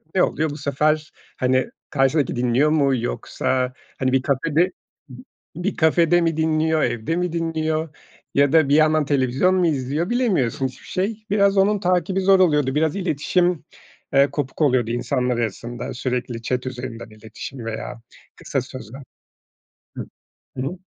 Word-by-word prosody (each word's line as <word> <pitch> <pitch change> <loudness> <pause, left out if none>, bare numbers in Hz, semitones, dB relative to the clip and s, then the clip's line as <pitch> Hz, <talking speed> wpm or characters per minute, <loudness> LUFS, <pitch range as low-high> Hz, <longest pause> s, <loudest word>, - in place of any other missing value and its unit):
ne 185 - +4
oluyor 155 0 0
bu 145 - -6
sefer? 150 +2 0 0.3
Hani, 130 - +1 0.2
karşıdaki 135 0 +1
dinliyor 125 +5 +2
mu 140 -4 +3
yoksa 125 +2 -2 0.3
hani, 130 -1 +1
bir 130 -1 +3
kafede 155 +6 +1 0.8
bir 180 +4 -2
kafede 170 +2 +4
mi 165 -1 0
dinliyor, 160 0 +1
evde 120 +8 -1
mi 180 -1 -1
dinliyor 160 -1 -1 0.5
ya 140 0 +4
da 155 -4 +5
bir 145 - +4
yandan 155 -1 +4
televizyon 135 +6 +2
mu 180 -2 +3
izliyor, 145 - -1
bilemiyorsun 180 - +1
hiçbir 125 - -13
şey. 210 +3 -3
Biraz 200 -1 +3
onun 200 +1 +3
takibi 185 +1 +1
zor 190 0 +5
oluyordu. 150 -6 +3
Biraz 155 +2 +1
iletişim, 175 -1 0 0.5
eee, 140 +1 +5
kopuk 145 +1 -4
oluyordu 125 -5 +2
insanlar 125 0 -1
arasında 120 +3 -4
sürekli 125 -2 -3
chat 125 +2 -2
üzerinden 120 -3 -6
iletişim 110 +3 -9
veya 115 +1 -6 0.3
kısa 135 - -2
sözler. 130 0 -9 1.0
Hıı. - - -5 0.5
Hı 130 - -2
hı. 180 - -5
145 Hz, 145 wpm, -22 LUFS, 130-165 Hz, 1.0 s, da